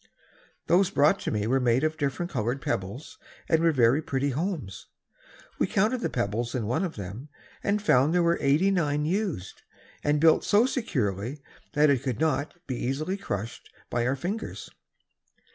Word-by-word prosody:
Those 180 +2 +4
brought 150 +7 +3
to - - -3
me 105 -1 -1
were 130 +4 +2
made 125 +1 +2
of 155 0 +1
different 150 +4 -2
colored 120 +2 -1
pebbles 100 +5 -4 0.3
and 160 -1 +3
were 165 0 +4
very 130 +1 +3
pretty 140 -1 -1
homes. 140 - -4 0.7
We - - +2
counted 220 +6 +1
the - - -1
pebbles 115 +5 -2
in 120 -4 -1
one 125 - 0
of 180 - -3
them 105 +8 -7 0.3
and 205 +1 +1
found 145 -8 +3
there 175 0 +3
were 170 0 +2
eighty 150 +8 +3
nine 150 -5 0
used, 180 - -2 0.4
and 145 0 +2
built 160 +1 +5
so 215 +3 +4
securely 135 - -2 0.3
that 150 -1 +4
it 130 -4 +1
could 130 -4 -3
not 155 -1 0
be 130 - -4
easily 150 +9 -1
crushed 115 - -5 0.2
by 120 0 0
our 130 - +1
fingers. 190 +11 -5
145 Hz, 170 wpm, -27 LUFS, 120-170 Hz, 0.7 s, built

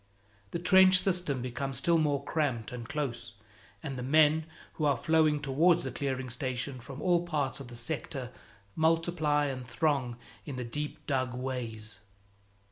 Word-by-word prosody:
The - - -3
trench 185 +1 +6
system 175 -9 0
becomes 130 +1 -3
still 165 +5 +3
more 145 -3 +1
cramped 135 -8 -1
and 120 -2 -7
close, 120 -6 -3 0.5
and 135 -3 -4
the - - -3
men 155 +4 +4 0.3
who 155 - -2
are 140 -3 +3
flowing 155 +1 +3
towards 155 +5 +3
the 130 - -3
clearing 130 -1 -2
station 130 +1 -3
from 135 +4 -9
all 175 -2 +3
parts 150 -7 -1
of 135 - -8
the 120 - -9
sector 130 +1 -3 0.4
multiply 160 -2 +2
and 130 -2 -3
throng 130 -2 0 0.3
in 145 - -6
the 125 -1 -4
deep 150 +4 -5
dug 130 -3 -1
ways. 115 -5 -4
140 Hz, 155 wpm, -30 LUFS, 125-155 Hz, 0.5 s, trench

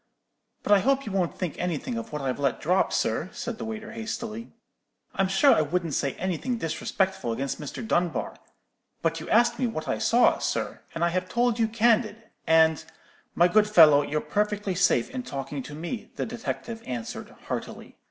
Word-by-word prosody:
"'But - - -2
I 205 - +7
hope 275 +5 +1
you 215 - -5
won't 185 -3 -1
think 180 -5 -3
anything 180 - -2
of 230 0 -5
what 150 -2 -4
I've 130 0 -2
let 140 -3 0
drop, 180 +5 +2
sir,' 115 +11 0
said 240 -1 -5
the - - -4
waiter, 220 -1 -6
hastily. 225 0 -5 0.6
'I'm 195 - +1
sure 195 +9 +5
I - - +3
wouldn't 165 +1 -1
say 135 0 0
any 185 -2 -2
thing 245 +7 -2
disrespectful 190 - -1
against 135 +6 -3
Mr. 150 - -6
Dunbar; 175 -5 -1 0.7
but 165 0 0
you 160 - -8
asked 235 +1 +3
me 255 - +1
what 155 -9 -5
I - - -1
saw, 240 +1 +4
sir, - - -2
and 165 +1 +1
I - - +2
have 185 +1 -2
told 240 -1 +1
you 225 - +3
candid, 225 -1 +1 0.2
and——' 160 -1 +4 0.5
"'My 175 - +5
good 210 +3 +3
fellow, 155 -8 +7
you're 150 +1 -2
perfectly 210 +4 -1
safe 180 +1 +2
in 260 -1 -4
talking 140 - -5
to 145 +3 -9
me,' 175 +9 -5
the - - -2
detective 230 0 -5
answered, 120 -3 -5 0.2
heartily. - - -6
190 Hz, 190 wpm, -26 LUFS, 160-225 Hz, 0.7 s, I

